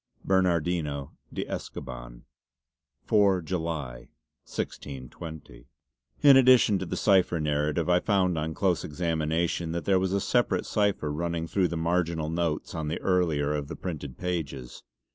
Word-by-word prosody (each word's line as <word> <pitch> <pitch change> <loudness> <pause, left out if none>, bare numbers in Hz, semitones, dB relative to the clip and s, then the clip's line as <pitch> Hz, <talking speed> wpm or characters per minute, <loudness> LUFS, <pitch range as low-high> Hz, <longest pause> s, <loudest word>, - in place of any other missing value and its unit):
"BERNARDINO 85 -6 +1 0.2
DE - - -3
ESCOBAN." - - -7 0.8
"4, 100 -4 +3
July, 80 -8 -4 0.4
1620." 65 -2 -7 0.6
In 140 -2 +9
addition 125 -6 +6
to 95 - -4
the - - -3
cipher 95 -4 +3
narrative 75 +2 0
I 90 0 +4
found 95 -3 +1
on 80 0 -3
close 95 -4 +1
examination 80 +1 -1
that 85 - -3
there 95 -2 +3
was 95 0 0
a 100 - +2
separate 100 -4 +1
cipher 100 -8 0
running 85 +1 -2
through 90 +2 +1
the 85 0 -4
marginal 85 -1 0
notes 85 -2 -2
on 80 -2 -3
the 80 - -2
earlier 80 -6 +1
of 75 -1 -3
the - - -6
printed 75 -7 -6
pages. 70 -9 -4
85 Hz, 140 wpm, -27 LUFS, 75-90 Hz, 0.8 s, In